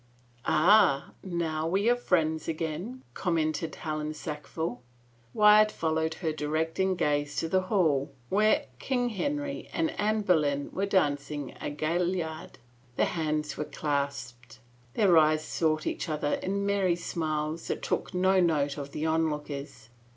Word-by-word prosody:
" 120 0 -30
Ah, 175 -3 +4
now 165 -3 -2
we 195 +5 +1
are 240 - +5
friends 160 -9 0
again 165 +11 -4
I - - -33
" - - -34
commented 160 -2 -1
Helen 155 -1 -4
Sackville. 150 -3 -5 0.5
Wyatt 210 - +6
followed 160 -2 -1
her 160 -4 -2
directing 160 +5 0
gaze 145 -3 0
to 165 - -1
the 185 +3 +2
hall 155 -9 +2 0.2
where 210 - +3
King 245 - 0
Henry 285 +6 -3
and 325 -1 0
Anne 215 +1 +1
Boleyn 150 -7 +1
were 195 +2 -1
dancing 145 -6 0
a - - -2
gaillard. 160 +2 -2 0.4
Their - - +3
hands 155 -3 -2
were 150 - -2
clasped; 140 -6 -3 0.4
their 195 -5 +4
eyes 155 0 +3
sought 155 -2 0
each - - -3
other 150 -1 -1
in 200 +1 -1
merry 195 -3 +2
smiles 155 -2 -3
that - - -3
took - - -1
no 185 +1 +3
note 150 -5 +1
of 140 0 -7
the 155 - -2
onlookers. 150 -6 -2
160 Hz, 145 wpm, -28 LUFS, 150-190 Hz, 0.5 s, Wyatt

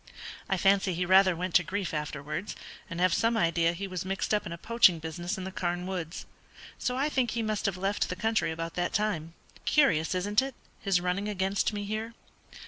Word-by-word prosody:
I 195 - +2
fancy 195 -1 +3
he 180 +1 0
rather 185 0 +6
went 180 +1 -3
to 180 - +6
grief 190 +2 -3
afterwards, 150 +4 -4 0.3
and 170 - -5
have 180 -1 +3
some 230 +4 +2
idea 170 -3 +2
he 195 +3 -5
was 185 -2 -4
mixed 195 +3 -2
up 210 -1 +1
in - - -6
a 170 - -5
poaching 220 -3 +4
business 165 +3 -4
in 190 - -5
the 190 - -5
Carne 175 -1 -2
woods. 180 -3 -4 0.5
So 250 0 -1
I 280 +3 +2
think 260 -5 +1
he 230 -1 -1
must 215 -2 -1
have 190 -2 -1
left 195 +2 0
the 180 - -2
country 220 +2 +1
about 165 +1 -4
that 175 - -1
time. 170 -6 -1 0.3
Curious, 185 - +3
isn't 205 +5 +2
it, 270 -1 -5 0.2
his 195 -3 +2
running 180 +4 -1
against 195 0 0
me 205 -1 -4
here? 215 +3 -4
190 Hz, 210 wpm, -29 LUFS, 175-210 Hz, 0.5 s, rather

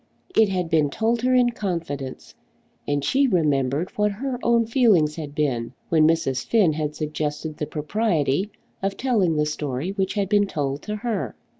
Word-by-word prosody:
It 220 -2 +5
had 180 -2 -1
been 155 -3 +2
told 225 +8 0
her 255 +1 +2
in 245 -1 +4
confidence, 165 - -5 0.5
and 145 -1 0
she 275 +1 +3
remembered 150 - +1
what 210 0 +1
her 250 +3 -4
own 235 -1 +3
feelings 215 - +3
had 150 -3 -7
been 130 -6 -1 0.2
when 155 -2 +5
Mrs. 135 -6 +1
Finn 205 -9 +3
had 150 -1 -3
suggested 155 0 -3
the 150 -2 -3
propriety 160 0 0 0.3
of 195 0 -2
telling 210 -11 +1
the 150 0 +2
story 150 +2 -3
which 195 0 -2
had 200 -2 0
been 205 0 +3
told 145 -5 -2
to 210 - -4
her! 220 0 -3
165 Hz, 170 wpm, -23 LUFS, 150-210 Hz, 0.5 s, It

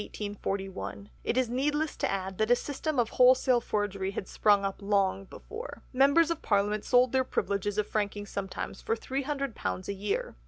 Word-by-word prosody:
It - - -1
is 255 -1 +3
needless 295 +6 0
to - - 0
add 190 -1 -3
that 215 +1 +2
a 245 - +7
system 285 +3 -3
of 235 -2 +2
wholesale 250 -1 +6
forgery 200 -4 -1
had 195 - -5
sprung 205 -2 +3
up 195 +1 -4
long 195 -1 +1
before." 450 - -9
"Members 280 +6 +5
of 335 - -2
Parliament 205 0 +1
sold 250 -1 +4
their 260 0 +3
privileges 205 -4 -1
of 210 - +2
franking 205 -1 -2
sometimes 195 -1 -5
for 225 - 0
£300 270 -6 -3
a 200 - -2
year." 420 - -2
225 Hz, 165 wpm, -29 LUFS, 200-270 Hz, -, a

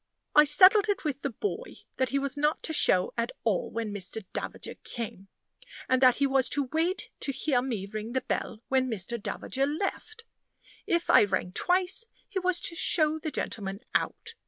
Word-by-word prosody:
I 300 - +7
settled 370 +8 +6
it 405 - 0
with 285 -3 -3
the 280 - -1
boy 415 - -5 0.2
that 260 -1 +1
he 275 - 0
was 280 0 -1
not 300 +2 0
to 320 - -3
show 185 -10 +4
at 230 +1 -1
all 220 -5 0
when 225 -2 -4
Mr. 205 +1 -3
Davager - - -5
came; 215 -5 -6 0.6
and 260 0 +2
that 255 -2 +6
he 280 - +1
was 270 -1 +3
to 280 -3 -1
wait 335 +4 0
to 275 - -1
hear 265 -2 0
me 230 -7 -3
ring 215 +3 -6
the 260 - 0
bell 225 -2 -4
when 260 -1 +1
Mr. 220 +1 -3
Davager 270 +6 -2
left. 405 +8 -4 0.6
If 340 0 +1
I - - +7
rang 185 -2 -2
twice, 365 - 0 0.2
he 400 -2 -3
was 365 -1 +1
to 335 - -2
show 315 -2 +3
the 310 - -4
gentleman 200 -7 -4
out. 460 +1 -2
275 Hz, 185 wpm, -28 LUFS, 230-335 Hz, 0.6 s, I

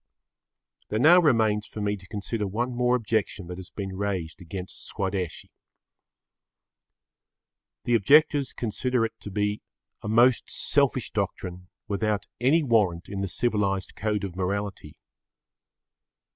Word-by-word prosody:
There 110 - -1
now 160 +9 +7
remains 110 -9 +2
for - - -8
me 105 0 0
to 95 -2 -14
consider 105 +1 -3
one 120 +6 -2
more 125 +1 +2
objection 110 -4 -1
that 90 +1 -7
has 95 - -10
been 95 -2 -5
raised 95 -5 -3
against 90 +2 -6
Swadeshi. 95 -5 -3 2.3
The 120 - 0
objectors 140 +5 +4
consider 120 +1 -1
it 115 - -5
to - - -8
be 105 +1 -1 0.4
a - - -6
most 120 +3 +4
selfish - - +1
doctrine 90 0 -3 0.2
without 105 0 -1
any 145 +7 +3
warrant 105 -9 +1
in 100 -1 -4
the 100 - -1
civilised 100 -2 -1
code 105 -1 -1
of 95 -3 -5
morality. 100 +2 -3
105 Hz, 130 wpm, -26 LUFS, 95-115 Hz, 2.3 s, now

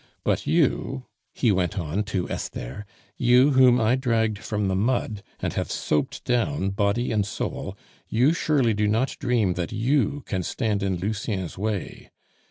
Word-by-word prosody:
But - - 0
you," 65 - +1 0.3
he 115 - +1
went 90 -2 0
on 85 +3 -1
to 95 -4 -2
Esther, 100 +13 -5 0.3
"you 125 +4 +5
whom 130 -2 +6
I 115 +2 +3
dragged 115 -5 0
from 105 -3 -2
the 95 - 0
mud, 110 0 0 0.2
and - - -2
have - - -2
soaped 75 - -1
down 125 -4 0
body 100 +5 0
and 105 -2 +2
soul, 100 - -4 0.3
you 125 +8 +3
surely 140 -8 +2
do 105 0 +1
not 115 +6 +1
dream 115 -7 +1
that 85 -1 -3
you 130 +4 +1
can 95 -3 -2
stand 105 +2 -1
in 95 -1 0
Lucien's 100 -1 -3
way? 105 0 -4
110 Hz, 160 wpm, -25 LUFS, 100-125 Hz, 0.3 s, whom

